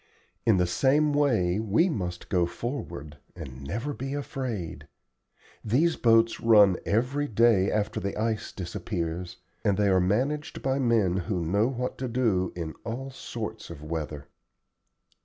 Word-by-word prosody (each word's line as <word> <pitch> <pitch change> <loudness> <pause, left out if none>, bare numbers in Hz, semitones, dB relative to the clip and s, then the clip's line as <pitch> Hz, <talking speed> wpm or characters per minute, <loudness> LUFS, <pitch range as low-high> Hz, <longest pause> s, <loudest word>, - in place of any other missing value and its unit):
In 110 -4 +5
the 90 - +3
same 140 - +2
way 110 -11 +2
we 110 - +2
must 90 - -4
go 90 -2 +2
forward, 85 - -6 0.2
and 65 -2 -9
never 115 - -3
be 135 +1 -4
afraid. 125 - -4 0.8
These 150 +10 +2
boats 115 -1 +3
run 105 -5 +6
every 130 +7 +1
day 110 -4 +4
after 105 -1 -1
the 100 - -4
ice 110 -1 -1
disappears, 85 -1 -4 0.3
and 100 -2 +2
they 105 -1 +3
are 95 -1 +4
managed 130 +11 -1
by 135 +1 +1
men 115 -8 +2
who 90 -2 -2
know 100 +7 +2
what 125 -1 -3
to 130 - -2
do 115 -7 +1
in 80 -3 -4
all 130 +4 -5
sorts 110 -4 -6
of 75 -3 -9
weather." 75 -2 -5
110 Hz, 145 wpm, -27 LUFS, 90-125 Hz, 0.8 s, run